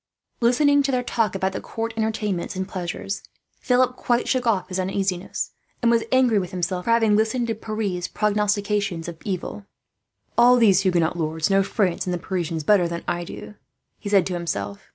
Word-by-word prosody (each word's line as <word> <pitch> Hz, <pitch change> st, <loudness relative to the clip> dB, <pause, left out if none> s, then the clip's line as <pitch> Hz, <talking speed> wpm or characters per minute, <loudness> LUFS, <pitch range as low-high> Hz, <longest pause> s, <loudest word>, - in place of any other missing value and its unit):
Listening 285 Hz, +4 st, +4 dB
to 275 Hz, 0 st, 0 dB
their 250 Hz, -1 st, 0 dB
talk 225 Hz, -5 st, 0 dB
about 190 Hz, 0 st, 0 dB
the -, -, -4 dB
court 225 Hz, 0 st, -4 dB
entertainments 215 Hz, -4 st, -2 dB
and 190 Hz, 0 st, -3 dB
pleasures, 185 Hz, +2 st, -4 dB, 0.4 s
Philip 250 Hz, 0 st, +2 dB
quite 240 Hz, -1 st, 0 dB
shook 255 Hz, -2 st, 0 dB
off 195 Hz, -5 st, +1 dB
his 185 Hz, 0 st, -2 dB
uneasiness, 190 Hz, -1 st, -2 dB, 0.3 s
and 235 Hz, -1 st, +3 dB
was 230 Hz, -1 st, +2 dB
angry 255 Hz, -5 st, +4 dB
with 180 Hz, -2 st, -4 dB
himself 180 Hz, 0 st, -3 dB
for -, -, -2 dB
having 225 Hz, -2 st, +4 dB
listened 225 Hz, +3 st, +1 dB
to -, -, +1 dB
Pierre's 215 Hz, -5 st, -3 dB
prognostications 205 Hz, -4 st, 0 dB
of 170 Hz, -2 st, -7 dB
evil. 200 Hz, +1 st, -4 dB, 0.7 s
"All 245 Hz, +1 st, +7 dB
these 205 Hz, -6 st, +5 dB
Huguenot 175 Hz, -3 st, +1 dB
lords 160 Hz, +2 st, -1 dB
know 195 Hz, 0 st, +5 dB
France 190 Hz, -3 st, 0 dB
and 180 Hz, -, 0 dB
the -, -, -2 dB
Parisians 170 Hz, -3 st, -3 dB
better 180 Hz, +1 st, +4 dB
than 170 Hz, 0 st, -5 dB
I 175 Hz, 0 st, -1 dB
do," 175 Hz, -, -9 dB, 0.5 s
he 205 Hz, -, -5 dB
said 200 Hz, -2 st, +4 dB
to 185 Hz, -, -3 dB
himself. 100 Hz, -, -4 dB
200 Hz, 185 wpm, -23 LUFS, 180-225 Hz, 0.7 s, All